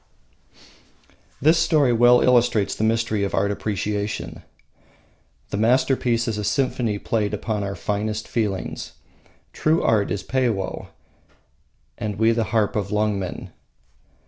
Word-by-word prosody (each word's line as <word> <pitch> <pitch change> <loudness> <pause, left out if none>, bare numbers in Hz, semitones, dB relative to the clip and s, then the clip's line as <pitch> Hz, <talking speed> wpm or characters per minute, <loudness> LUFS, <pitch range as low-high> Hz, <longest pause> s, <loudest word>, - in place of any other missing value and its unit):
This 160 +4 +4
story 155 -6 +3
well 120 +1 +5
illustrates 120 -4 +3
the - - -3
mystery 110 -2 +1
of 100 - -1
art 100 +1 +1
appreciation. 105 0 -3 1.1
The - - -2
masterpiece 125 0 +2
is 110 -2 -2
a - - -3
symphony 115 -1 0
played 105 -1 -1
upon 105 0 -3
our 100 0 -4
finest 105 +2 -3
feelings. 105 -5 -3 0.6
True 160 +2 +1
art 105 -3 +2
is 100 -3 -3
Peiwoh, 115 -6 -1 1.1
and 105 -2 -3
we 110 +2 +3
the 115 -1 0
harp 110 -2 0
of 105 -3 -1
Lungmen. 105 -3 -2
110 Hz, 120 wpm, -22 LUFS, 105-120 Hz, 1.1 s, well